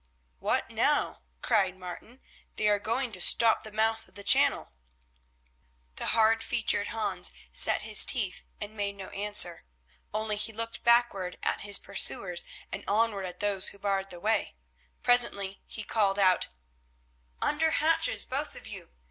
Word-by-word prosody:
"What - - -1
now?" - - 0 0.2
cried 190 -3 +1
Martin. 185 +8 -10 0.3
"They 210 - 0
are 205 -1 +2
going 235 +4 -2
to 185 -4 -3
stop 225 +4 +6
the 215 - -11
mouth 220 +1 -1
of - - -25
the 200 - -9
channel." - - +3 1.3
The - - -4
hard 225 0 +3
featured 215 -3 0
Hans 225 -1 -3 0.2
set - - +3
his - - +6
teeth 205 -8 -2 0.2
and 210 +1 -8
made 200 -1 -3
no 195 -1 -9
answer. 200 -4 +3 0.5
Only 215 0 -2
he 215 +2 -1
looked 230 +1 -6
backward 235 -7 +2
at - - -1
his 205 -1 +3
pursuers 195 -2 0 0.3
and - - -6
onward 205 -2 0
at 180 - -10
those 200 -2 +2
who - - -6
barred 195 -1 -2
the 175 - -10
way. 215 - -1 0.5
Presently 200 -5 +2
he 220 - -7
called 205 -3 0
aloud: 185 -2 +3 0.9
"Under 320 +2 +1
hatches, 325 +1 +1
both - - -4
of - - -11
you. 60 - -10
205 Hz, 155 wpm, -28 LUFS, 195-225 Hz, 1.3 s, stop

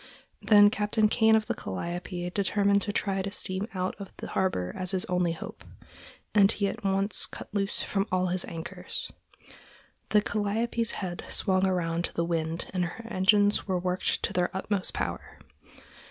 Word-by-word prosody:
Then 205 -1 +7
Captain 215 +1 +2
Kane 220 0 +4
of 220 -1 +2
the - - -1
Calliope 175 - -4
determined 200 +1 +2
to 205 - -2
try 195 -2 0
to 195 - -3
steam 195 0 -3
out 185 0 -1
of 195 -2 -8
the - - -7
harbor 90 - 0
as 185 -1 -2
his 190 -1 +1
only 180 -2 +1
hope, 165 - -9 0.7
and 205 -1 +6
he 200 -2 0
at - - -5
once 195 +1 +1
cut - - -10
loose 200 -1 0
from 195 +1 -1
all 185 0 +2
his 180 0 0
anchors. 165 0 -3 1.0
The 210 -1 +4
Calliope's 225 +3 0
head 180 -3 -4
swung 190 -1 +2
around 170 -2 0
to - - -6
the 170 - +1
wind 165 -1 -2
and 180 -2 +1
her 225 +6 -7
engines 205 +2 +3
were 185 -2 +1
worked 180 +1 -1
to - - -1
their 180 -1 +1
utmost 195 0 -2
power. - - -4
190 Hz, 170 wpm, -28 LUFS, 180-205 Hz, 1.0 s, Then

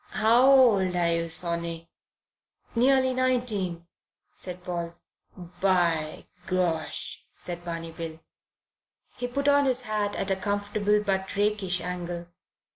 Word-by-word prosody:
"How 230 +5 +5
old 210 -9 +5
are 170 -1 +3
you, 165 0 -1
sonny?" 170 0 -1 0.8
"Nearly 260 +2 +3
nineteen," 235 -10 0 0.5
said 180 -1 -7
Paul. 170 -1 -4 0.4
"By 175 -3 0 0.2
Gosh!" 160 -9 -2
said 175 -1 -6
Barney 165 -1 -5
Bill. 160 -1 -7 1.0
He 245 - -2
put 280 +3 -2
on 285 0 +5
his 255 -1 +1
hat 210 -2 -1
at 195 - -1
a - - +3
comfortable 205 +1 0
but 190 -1 -1
rakish 200 -3 +1
angle. 175 -1 -4
185 Hz, 120 wpm, -27 LUFS, 170-215 Hz, 1.0 s, How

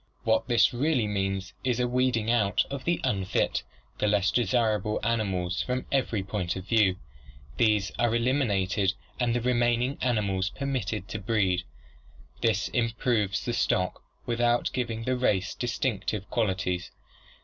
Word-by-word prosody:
What 110 0 +2
this 120 -1 +4
really 130 -1 +1
means 95 -1 -2
is 125 -2 0
a 125 - +2
weeding 120 -3 +1
out 105 -5 +2
of 140 -1 -5
the 170 0 +1
unfit, 95 -1 0 0.4
the 105 - +2
less 100 -2 +2
desirable 110 -2 +1
animals 95 -6 0
from 125 0 -2
every 120 -7 0
point 95 -2 -2
of 95 -1 -6
view. 105 -5 +4 0.6
These 105 -3 +2
are 120 - +3
elimin 120 +2 +1
ated 95 0 +1 0.2
and 120 -1 +1
the 120 - 0
remaining 120 +2 +1
animals 100 -6 +1
permitted 125 -7 -3
to - - -4
breed. 95 -4 +1 0.8
This 110 -4 +2
improves 115 -4 0
the 120 - -1
stock 90 -5 0 0.2
without 120 0 +1
giving 115 -3 -2
the 130 +2 0
race 100 -7 +1
distinctive 110 -5 -2
qualities. 95 -5 -1
110 Hz, 140 wpm, -27 LUFS, 100-120 Hz, 0.8 s, this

